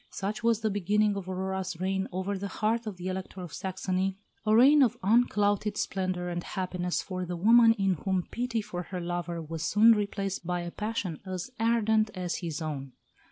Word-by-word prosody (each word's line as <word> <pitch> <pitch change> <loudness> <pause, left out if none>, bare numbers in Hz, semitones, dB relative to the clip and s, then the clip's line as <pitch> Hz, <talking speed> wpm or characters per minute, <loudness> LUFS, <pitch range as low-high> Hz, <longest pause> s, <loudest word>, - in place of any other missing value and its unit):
Such 205 +2 -4
was 230 -1 +2
the 220 -1 0
beginning 205 +2 +2
of 190 -2 -5
Aurora's 190 -1 -3
reign 190 +1 -1
over 190 +2 -2
the 200 +1 -4
heart 220 +3 -1
of 200 -4 -5
the 180 +1 -5
Elector 185 0 -5
of 175 -4 -8
Saxony 190 0 -2 0.3
a 215 - +5
reign 280 +6 +7
of 250 -5 +3
unclouded 210 -1 +2
splendour 185 -3 -2
and 175 0 -3
happiness 180 -2 -2
for 185 -1 -4
the 175 0 -4
woman 225 +4 +6
in 195 -3 +1
whom 185 +2 -1
pity 235 -2 -1
for 175 -3 -5
her 180 +1 -6
lover 175 -1 -3
was 160 0 -6
soon 210 +7 +5
replaced 200 -3 -1
by 175 0 -2
a 175 0 -5
passion 210 -6 -3
as 185 +4 -5
ardent 220 -1 +2
as 180 -2 -2
his 165 -2 -4
own. 140 -4 -5
190 Hz, 190 wpm, -29 LUFS, 180-215 Hz, 0.3 s, reign